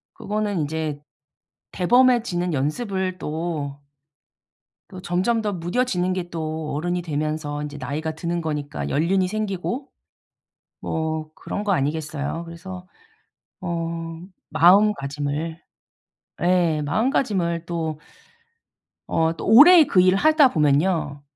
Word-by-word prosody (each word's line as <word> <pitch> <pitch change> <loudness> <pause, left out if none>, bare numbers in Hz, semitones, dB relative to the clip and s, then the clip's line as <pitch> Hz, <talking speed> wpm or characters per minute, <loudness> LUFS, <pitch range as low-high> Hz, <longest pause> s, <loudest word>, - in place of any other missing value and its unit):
그거는 205 -4 -2
인제 150 -1 -3 0.7
대범해지는 220 -5 +2
연습을 185 - -2
또 155 -3 -4 1.1
또 185 -1 -9
점점 190 +6 0
더 210 - -1
무뎌지는 180 +1 -1
게 180 -2 -4
또 155 -2 -4
어른이 175 +4 -1
되면서 150 -2 -3
이제 145 0 -6
나이가 155 +2 -3
드는거니까 160 -3 -3
연륜이 185 +5 +1
생기고 215 +6 -3 0.9
뭐 160 -1 -3
그런 205 - -5
거 205 - +1
아니겠어요. 150 +1 -2
그래서 180 +2 -9 0.7
어 165 -2 -4 0.3
마음가짐을 160 -3 +2 0.8
예 175 -4 +2
마음가짐을 175 - 0
또 160 -3 -3 1.1
어 160 0 +1
또 - - -6
오래 315 +9 +9
그 185 - +2
일을 185 +1 +4
하다 310 0 +5
보면요, 150 -1 +1
170 Hz, 235 characters per minute, -23 LUFS, 155-190 Hz, 1.1 s, 오래